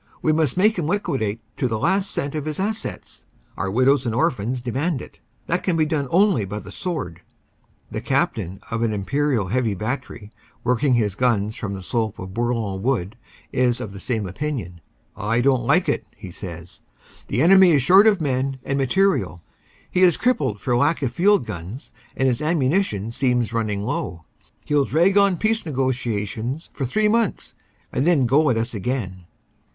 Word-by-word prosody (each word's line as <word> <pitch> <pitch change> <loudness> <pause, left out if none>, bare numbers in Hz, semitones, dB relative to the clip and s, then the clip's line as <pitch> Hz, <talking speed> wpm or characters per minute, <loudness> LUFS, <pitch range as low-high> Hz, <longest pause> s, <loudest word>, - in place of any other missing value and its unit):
We 155 - +3
must 155 -1 +1
make 210 +1 +3
him 155 - -1
liquidate 135 - -1 0.2
to 130 - +1
the 110 -2 -2
last 190 - +1
cent 140 0 -3
of 150 -2 -3
his 155 +1 -4
assets. 215 +3 -5 0.3
Our 95 +2 -2
widows 130 +4 +3
and 115 - -1
orphans 125 -3 0
demand 135 +6 -2
it. - - -12 0.3
That 180 - 0
can 180 -3 0
be 155 - +3
done 150 -3 -1
only 190 - +3
by 100 +2 -5
the - - -8
sword." 130 - -4 0.7
The - - -4
Captain 90 +3 -1
of 115 0 -1
an 115 -2 +1
imperial 115 0 0
heavy 115 -2 0
battery, 110 0 -5 0.3
working 125 +2 +2
his 105 -4 +1
guns 110 -2 +1
from 100 -4 -4
the 95 - -8
slope 110 +1 -2
of 95 0 -8
Bourlon 115 -4 -1
Wood, 110 -6 -1 0.4
is 125 -1 +2
of 100 - -6
the 100 - -8
same 110 0 -2
opinion. 95 - -4 0.3
"I 115 +3 0
don 130 +1 +3
t 120 - -6
like 175 0 +3
it," 115 -7 -1
he 95 - -9
says. 85 -1 -9 0.5
"The 120 +6 +1
enemy 190 +1 +7
is 140 -4 +3
short 190 +9 +7
of 205 -3 +4
men 135 -2 -1
and 135 0 -1
material. 135 - +1 0.5
He - - 0
is 180 -4 +5
crippled 145 - 0
for 125 +2 0
lack 145 +5 +2
of 120 -3 -1
field 200 -1 +3
guns 95 - -7 0.3
and 135 - +2
his 125 0 0
ammu 150 -4 +1
nition 115 - -1
seems 125 -3 +1
running 105 -3 -1
low. 85 -5 -3 0.4
He - - -3
ll 145 - +4
drag 175 +8 +2
on 200 -3 +3
peace 220 +3 0
negotiations 125 - -2
for 135 - -3
three 210 - +1
months 225 -1 0 0.4
and 135 - +1
then 155 -7 +4
go 145 +5 +3
at 120 - +2
us 115 +2 -2
again." 95 -4 -3
130 Hz, 185 wpm, -22 LUFS, 110-155 Hz, 0.7 s, enemy